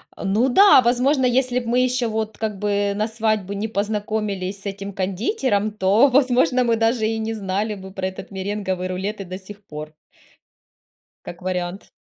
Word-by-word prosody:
Ну 215 +7 +1
да, 390 +1 +7
возможно, 255 +3 +2
если 250 0 +2
б 240 - -8
мы 240 +2 +2
еще, 250 -1 +1
вот, 220 0 -3
как 215 -2 -3
бы 205 0 0
на 210 +1 0
свадьбу 215 -3 -1
не 205 +2 -2
познакомились 205 -2 -2
с - - -14
этим 200 0 -5
кондитером, 205 - 0
то, 210 +5 +4
возможно, 255 -1 +3
мы 235 -1 +2
даже 225 0 +1
и 225 0 -1
не 220 +1 -2
знали 205 +1 -2
бы 190 -1 -10
про 190 -1 -3
этот 190 +1 -8
меренговый 190 -1 -3
рулет 195 +3 -4
и - - -6
до 185 +1 -6
сих 200 +2 -12
пор. 155 -4 -8 1.3
Как 175 - -9
вариант. 180 +1 -4
210 Hz, 175 wpm, -22 LUFS, 195-230 Hz, 1.3 s, да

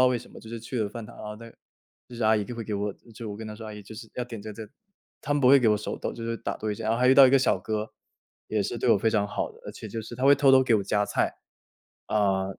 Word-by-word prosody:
道 - - +7
为 125 -1 +1
什 120 - -14
么， - - -12
就 110 - -12
是 115 -1 -6
去 120 +2 -5
了 105 - -1
饭 115 +1 -8
堂， 115 - -13
然 - - -9
后 105 0 -6
那 115 +1 -11
个 - - -23 0.5
就 120 - -10
是 115 - -3
阿 110 0 +5
姨 105 - -1
就 120 - -7
会 115 -1 -5
给 105 -1 -3
我 100 0 -2 0.2
就 110 -1 -6
我 100 - -6
跟 110 - -7
她 105 - -7
说： 110 - -9
“阿 110 - -7
姨 105 - -9
就 105 +3 -11
是 115 0 -10
要 125 - -2
点 115 -3 -8
这 110 0 -7
这。 110 0 -9 0.5
“她 145 - -1
们 145 - +1
不 125 - +5
会 140 - +8
给 115 - +4
我 105 - +4
手 105 - -5
抖， - - -3
就 115 - -8
是 115 0 -2
打 - - -4
多 110 - -2
一 - - -3
下。 - - -7
然 110 - +1
后 115 - 0
还 125 - +4
遇 130 - +7
到 135 0 +9
一 - - +3
个 135 - +6
小 130 - +2
哥， 110 0 -3 0.6
也 105 -2 0
是 110 - -3
对 120 - +2
我 100 - +5
非 110 - +2
常 105 -2 +1
好 105 - -3
的， - - -18
而 - - -6
且 110 - -9
就 110 +2 -5
是 110 - -9
他 130 - -2
会 140 +1 +8
偷 135 -2 +4
偷 130 0 +7
给 120 -3 +3
我 100 - -1
加 105 +1 +1
菜。 - - 0 0.7
啊， 100 -3 +1
110 Hz, 375 characters per minute, -27 LUFS, 105-120 Hz, 0.7 s, 到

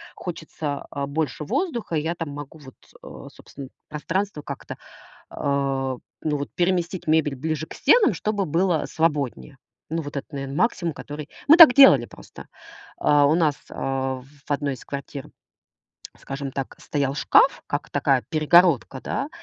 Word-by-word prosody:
хочется, 160 -4 -6
а, 140 - -3
больше 150 0 -3
воздуха. 235 - -2
И 155 - +1
я 165 +3 -2
там 165 -3 -5
могу 145 +2 -9
вот, 135 -3 -14 0.3
а, - - -10
собственно 135 -2 -12 0.2
пространство 165 +3 -3
как-то, 140 -2 -8 0.6
а, 135 -2 -1 0.3
ну 150 -2 0
вот, 145 - -4
переместить 175 0 -1
мебель 155 -3 +2
ближе 155 +2 -3
к - - -11
стенам, 420 - +4
чтобы 205 +2 -1
было 170 0 +1
свободнее. 145 - -2 0.3
Ну 165 +1 -2
вот 145 -1 -8
это 140 - -4
наверно 135 -1 -5
максимум, 170 -4 0
который 150 +1 -8 0.2
мы 315 - +9
так 320 -8 +10
делали 145 - +7
просто. - - -13 0.5
А, 145 -1 +4
у 150 - +3
нас, 155 -4 +2
а, 135 0 -2
в 140 +3 -17
1 140 -1 -1
из - - -13
квартир, 140 0 -7 0.9
скажем 135 0 -6
так 135 0 -5
стоял 140 -2 -2
шкаф, - - +3
как - - -3
такая 135 -2 +1
перегородка, 155 -4 +3
да. 280 - -3
150 Hz, 155 wpm, -23 LUFS, 140-170 Hz, 0.9 s, так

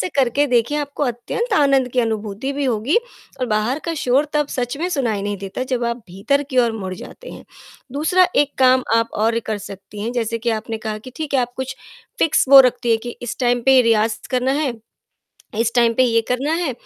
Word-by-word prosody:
से - - -1
करके 275 +2 +2
देखिए 245 +4 +1
आपको 290 0 -4
अत्यंत 280 - -2
आनंद 275 -6 +3
की 255 - +2
अनुभूति 220 +3 -3
भी 285 0 -2
होगी 245 - +1 0.4
और 255 - 0
बाहर 220 +6 0
का 335 - -2
शोर 265 +4 +2
तब 295 -1 +1
सच 245 -1 -3
में 350 +3 -1
सुनाई 235 - -1
नहीं 205 0 -2
देता, 195 +5 -5
जब 255 -2 -2
आप 235 0 -1
भीतर 240 +11 0
की 260 - 0
ओर 235 -2 +3
मुड़ 190 -4 -5
जाते - - -11
हैं। - - -11 0.5
दूसरा 360 +6 +3
एक 290 -1 +3
काम 260 0 +5
आप 230 0 +1
और 230 +1 +2
कर 215 -1 -2
सकती 200 0 -10
हैं, 230 - -3
जैसे 230 -1 -2
कि 235 +1 -1
आपने 225 0 -6
कहा 215 -1 -3
कि 255 +4 -11
ठीक 310 -3 -4
है, 265 - +4
आप 245 0 -3
कुछ 260 0 -5 0.4
फिक्स 325 - +3
वो 275 0 +10
रखती 245 -1 -1
हैं 225 - +4
कि 240 - -5
इस 245 - -4
टाइम 245 -1 +2
पे 265 +1 +6
रियाज़ 225 -1 +2
करना 255 +1 +1
है, 275 -5 0 0.9
इस 230 0 +1
टाइम 235 -1 +3
पे 260 - +3
ये 230 -2 +3
करना 275 +5 -1
है, 330 -5 0
245 Hz, 220 wpm, -20 LUFS, 225-275 Hz, 0.9 s, वो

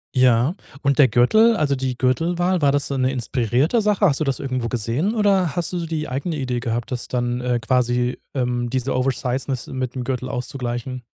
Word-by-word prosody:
Ja. 125 +3 +4 0.3
Und 140 0 +1
der 140 - +8
Gürtel 220 - +4
also 145 -2 +1
die 130 -2 -3
Gürtelwahl, 175 +7 +1
war 140 - +4
das 145 0 +1
so 140 - -3
'ne 130 0 +1
inspirierte 130 - +1
Sache? 210 -2 +2
Hast 140 - +2
du 155 - +1
das 135 -2 -1
irgendwo 130 -4 -2
gesehen 125 - -1
oder 195 -6 +2
hast 175 +1 -2
du 175 - -1
so 165 - -4
die 155 -1 -3
eigene 140 +6 -3
Idee 125 -3 -2
gehabt, 120 0 -3
das 125 - -3
dann, 120 0 -1
äh, 125 -1 0
quasi, 125 0 +1 0.2
ähm, 125 -1 -1
diese 130 +1 -1
Oversizeness 130 0 -1
mit 130 -1 -4
'nem 125 - -3
Gürtel 130 0 -3
auszugleichen? 125 0 -4
130 Hz, 200 wpm, -21 LUFS, 125-150 Hz, 0.3 s, der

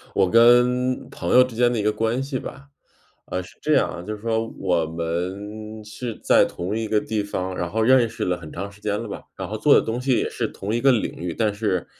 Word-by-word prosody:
我 95 -2 +3
跟 125 +2 +4
朋 - - -3
友 125 - +9
之 125 -2 -6
间 120 +1 +3
的 120 - -1
一 105 - -1
个 105 - +3
关 115 +4 -1
系 135 -2 -3
吧。 140 +1 -9 0.6
呃， 90 0 -3
是 90 - -16
这 - - +1
样 - - +3
啊， 85 - -6
就 105 +4 -5
是 105 - -14
说 115 0 -1
我 90 -4 +1
们 95 +7 -5
是 110 +2 -6
在 - - +5
同 95 +5 -4
一 110 -1 -2
个 105 -1 +2
地 110 -2 -2
方， 95 -2 -4
然 85 -1 -2
后 110 +4 -1
认 125 -1 +5
识 - - -5
了 90 -1 0
很 80 -3 -11
长 100 +1 -5
时 100 - -18
间 105 0 -2
了 - - -7
吧， - - -7
然 - - -6
后 - - -3
做 - - +5
的 - - +6
东 115 +2 -3
西 130 -1 +1
也 - - 0
是 - - -2
同 100 +3 -5
一 120 - +1
个 135 +1 +5
领 110 - 0
域。 85 0 -4
但 110 -2 +1
是， 100 -4 -1
110 Hz, 275 characters per minute, -23 LUFS, 95-120 Hz, 0.6 s, 友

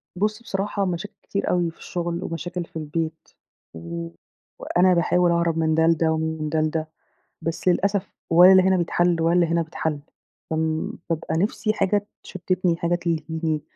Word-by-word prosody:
بصي 215 +5 -1
بصراحة، 200 -1 -2
مشاكل 180 +3 -4
كتير 200 - -2
أوي 175 -2 +1
في - - -26
الشغل، 170 0 -4
ومشاكل 175 +1 -4
في - - -31
البيت، 160 +1 -4 0.5
و 85 0 -6 0.5
وأنا 180 +1 +3
باحاول 175 0 +3
اهرب 170 -1 +1
من 160 -1 +2
ده 160 0 +3
لده، 165 -1 +3
و 160 - +1
من 160 -1 -2
ده 155 0 +1
لده، 155 0 -1 0.6
بس 165 +3 -2
للأسف 200 +2 +1 0.2
ولا 175 +3 +8
اللي 190 -1 +7
هنا 190 0 +3
بيتحل، 175 -1 +1
ولا 165 +1 +2
اللي 175 -1 +4
هنا 170 0 +1
بيتحل 160 -2 -3 0.5
فم 160 0 -1 0.2
بابقى 160 -1 -2
نفسي 215 +3 0
حاجة 205 0 0 0.2
تشتتني، 185 -2 -1
حاجة 170 +1 0
تلهيني، 160 -2 -2
170 Hz, 165 wpm, -23 LUFS, 160-180 Hz, 0.6 s, ولا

